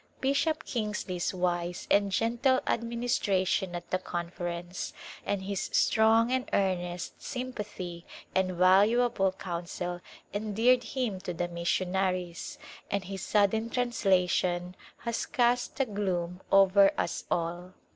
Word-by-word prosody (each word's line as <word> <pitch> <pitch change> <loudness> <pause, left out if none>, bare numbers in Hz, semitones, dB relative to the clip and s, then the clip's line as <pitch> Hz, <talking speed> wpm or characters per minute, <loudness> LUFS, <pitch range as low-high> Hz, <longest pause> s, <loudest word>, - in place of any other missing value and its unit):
Bishop 280 +4 +1
Kingsley's 210 -6 -2
wise 175 -1 -2
and 200 0 +4
gentle 240 +6 +2
administration 215 -6 0
at 175 0 -7
the 185 - +1
Conference, 175 0 -4 0.3
and 200 -2 -1
his 195 0 -3
strong 225 +2 +4
and 260 0 0
earnest 180 -3 -1
sympathy 210 -9 -6
First - - -25
Hot - - -15
Season 190 -1 +2
and 180 - -5
valuable 195 +3 +4
counsel 175 -1 -5 0.3
endeared 220 +4 +2
him 245 -8 -2
to 180 - -5
the 175 +1 -1
missionaries, 180 0 -1 0.3
and 200 -1 -1
his 190 0 -6
sudden 215 +3 +2
translation 185 -7 +1 0.2
has 235 -1 -3
cast 245 +2 +1
a 270 - +3
gloom 185 -5 -2
over 195 0 +6
us - - -2
all. 175 +2 -2
190 Hz, 125 wpm, -29 LUFS, 180-230 Hz, 0.3 s, over